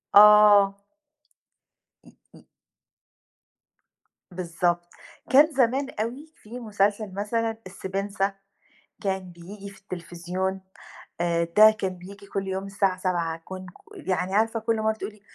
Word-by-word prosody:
آه. 205 -1 +7 1.2
م - - -18 0.2
م - - -17 1.9
بالضبط، 175 0 -1 0.4
كان 290 +4 +6
زمان 265 0 +1
أوي 265 +8 -4
في 235 +4 -10
مسلسل 205 -2 -1
مثلًا 225 +2 -2
السبنسة 195 +1 -3 0.7
كان 190 -2 -2
بييجي 195 +4 -10
في 195 - -16
التليفزيون 185 +1 -4 0.6
آآ 170 -1 +1
ده 215 +1 +9
كان 190 -4 -4
بييجي 200 +3 -12
كل 195 -1 -3
يوم 190 +1 -3
الساعة 195 -1 0
19:00 170 -3 -1
كن 185 0 -8
ك 390 - -15
يعني 185 +1 0
عارفة 225 +1 +2
كل 220 0 -1
مرّة 220 0 +1
بتقول 220 - -6
لي 210 -1 -21
200 Hz, 120 wpm, -25 LUFS, 185-220 Hz, 1.9 s, ده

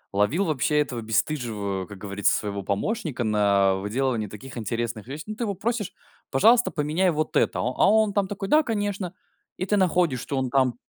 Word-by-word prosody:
ловил, 135 - +2
вообще, 150 -2 +1
этого 130 -5 -1
бесстыжего, 110 -4 -1
как 100 - -10
говорится, 100 +1 0
своего 100 -1 -4
помощника 145 - -2
на 100 -3 +3
выделывании 110 +3 -1
таких 120 +6 -10
интересных 115 -1 -3
вещ 145 +4 -6
Ну, 215 - -6
ты 235 - -3
его 200 -2 -2
просишь, 225 +1 -2 0.4
пожалуйста, 230 - +5
поменяй 160 +4 +1
вот 155 -1 -2
это, - - +2
а - - 0
а 125 +1 +2
он, 215 -1 +3
там, 200 -1 +1
такой, 195 0 -5
да, 305 +5 +6
конечно. 205 - -2 0.4
И 185 - -2
ты 205 +2 +1
находишь, 175 -8 +2
чё 140 - -3
он 130 -1 0
там 130 -2 +2
135 Hz, 185 wpm, -25 LUFS, -, 0.4 s, да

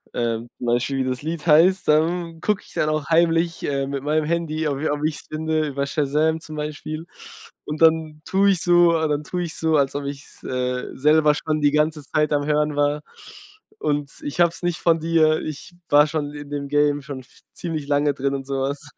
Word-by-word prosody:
Ähm, 115 0 -1
zum 125 - -6
Beispiel, 125 +3 0
wie 130 0 0
das 125 +1 -3
Lied 160 0 -4
heißt, 175 +5 +5
dann 165 +2 +1
guck 210 -2 0
ich - - -18
dann 155 - 0
auch 155 -2 -1
heimlich, 165 +1 +2
äh, 140 -1 -1
mit 140 -1 -3
meinem 155 +1 +1
Handy, 160 -1 -1
ob 140 -1 -2
i 155 - 0
ob 145 0 -2
ich’s 155 -1 -3
finde, 155 0 -1
über 140 0 -2
Shazam 155 +3 0
zum 155 -1 -9
Beispiel. 155 +2 -5 0.6
Und 150 +1 -5
dann 160 -1 +3
tue 200 +1 +3
ich 180 - -1
so 175 -1 +5
und 160 -1 0
dann 150 0 -1
tue 180 +3 -3
ich 165 - -6
so, 160 -1 +1
als 135 -1 +1
ob 145 0 -3
ich’s, 140 0 -9
äh, 125 0 -2
selber 150 +1 +4
schon 155 -1 -2
die 145 - +5
ganze 150 0 +1
Zeit 150 +2 0
am 145 0 +1
Hören 150 0 +1
war. 145 +1 +1 0.8
Und 145 -2 -1
ich 145 +4 -5
hab’s 170 +1 +1
nicht 175 -1 -1
von 165 -1 +3
dir, 160 -1 +2
ich 155 +3 -7 0.2
war 145 +1 +6
schon 150 -1 -3
in 145 -1 -9
dem 145 -1 -3
Game 145 0 +2
schon 140 -2 -6
f 125 - -23
ziemlich 160 -5 -5
lange 145 0 +2
drin 140 +1 -1
und 135 -1 -6
so 135 -1 -2
was. 140 +2 -3
150 Hz, 215 wpm, -22 LUFS, 145-160 Hz, 0.8 s, war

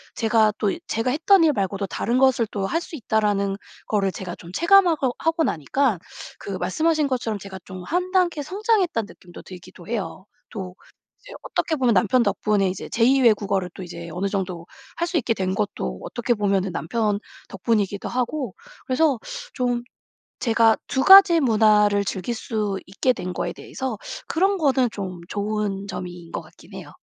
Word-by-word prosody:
제가 220 -1 +3
또 205 -2 +1 0.2
제가 225 +3 0
했던 330 +5 +4
일 310 -2 +4
말고도 195 -2 -2
'다른 235 +5 -1
것을 255 -4 +3
또 200 -2 -2
할 330 +12 -1
수 340 - -8
있다.'라는 210 -5 0 0.3
거를 195 -3 +1
제가 180 -2 -6
좀 170 - -12
체감하고 335 - +4
하고 325 0 +1
나니까 210 - 0 0.4
그 - - -7
말씀하신 300 - +1
것처럼 235 -5 -2
제가 190 -1 -9
좀 185 -1 -8
1 360 - -2
단계 355 -5 +2
성장했다는 380 - 0
느낌도 175 -1 -13
들기도 180 -1 -12
해요. 215 -4 -4 0.2
또 185 -4 -7 0.5
이제 - - -12
어떻게 320 - -1
보면 255 -5 +2
남편 235 +6 +3
덕분에 210 -4 +1
이제 185 - -6
제2 255 +4 +3
외국어를 200 -5 +2
또 190 - -8
이제 170 -1 -8
어느 180 +4 -2
정도 185 -4 -3 0.3
할 340 - 0
수 350 - -1
있게 240 - +1
된 185 -1 -1
것도 190 - -3
어떻게 240 0 -1
보면은 195 -3 0
남편 205 +5 -1 0.3
덕분이기도 200 0 -1
하고 250 -2 -2 0.3
그래서 270 -1 +2 0.3
좀 245 -2 -1 0.6
제가 225 -2 +4
2 265 - 0
가지 385 -3 +9
문화를 210 -4 +4
즐길 195 +5 -3
수 215 -3 -2
있게 225 +7 +1
된 180 -5 -5
거에 - - -3
대해서 260 -6 -5 0.3
그런 385 +4 +2
거는 265 -6 +2
좀 185 -3 -6
좋은 205 -1 -2
점인 175 -3 -7
것 - - -4
같긴 - - -18
해요. - - -10
220 Hz, 325 characters per minute, -23 LUFS, 195-265 Hz, 0.6 s, 가지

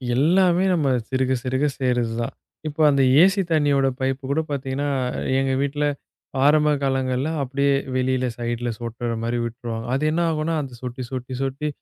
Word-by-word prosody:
எல்லாமே 175 +6 +3
நம்ம 155 -5 +1 0.2
சிறுக 130 0 0
சிறுக 130 +3 0
சேருறது 125 -3 0
தான். 115 - -3 0.3
இப்போ 155 +1 -3
அந்த 140 -1 +3 0.2
ஏசி 195 +2 +4
தண்ணியோட 145 -3 +3
பைப் 130 0 -1
கூடப் 155 +2 -1
பாத்தீங்கன்னா, 140 +1 -2 0.5
எங்க 135 0 0
வீட்டுல 145 +1 0 0.6
ஆரம்ப 150 +1 +5
காலங்கள்ல 130 +1 0
அப்டியே 140 +1 +1 0.2
வெளியில 130 0 +1
ஸைட்ல 120 0 -2
சொட்டுற 120 0 -4
மாரி 120 +1 -1
விட்டுருவாங்க. 115 -1 -5
அது 135 - 0
என்ன 165 +2 0
ஆகும்னா 155 +1 -1
அந்தச் 130 -4 -9
சொட்டி, 125 +1 -5
சொட்டி, 130 0 -5
சொட்டி 135 +3 -2
135 Hz, 150 wpm, -23 LUFS, 125-150 Hz, 0.6 s, ஆரம்ப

